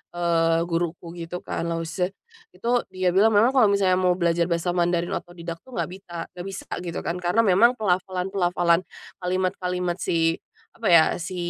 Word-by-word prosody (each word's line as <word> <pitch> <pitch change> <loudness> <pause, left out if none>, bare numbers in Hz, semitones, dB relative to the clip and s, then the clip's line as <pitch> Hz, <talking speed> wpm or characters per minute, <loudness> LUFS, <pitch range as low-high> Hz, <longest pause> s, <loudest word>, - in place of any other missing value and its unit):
eee, 165 -1 +2
guruku 170 0 -3
gitu 170 +1 -6
kan, 170 - -3
laoshi, 165 +2 -2 0.5
itu, 235 - -4 0.2
dia 185 -1 0
bilang 210 +3 +4
memang 230 +5 +5
kalau 255 -6 +5
misalnya 190 -2 +2
mau 180 -1 +3
belajar 170 -1 +1
bahasa 170 0 0
Mandarin 175 0 0
otodidak 170 -1 -6
tuh 255 +6 -14
nggak - - -2
bisa 185 -2 -11 0.2
nggak 180 +1 -8
bisa 195 0 -7 0.2
gitu 170 -2 -4
kan, 170 - -2
karena 180 +6 +2
memang 220 +5 +5
pelafalan-pelafalan, 180 -3 +1 0.4
kalimat-kalimat 180 -1 -1
si 165 -2 +1 0.3
apa 225 - -4
ya, 165 -2 +8 0.2
si 175 +2 -5
180 Hz, 160 wpm, -24 LUFS, 170-190 Hz, 0.5 s, ya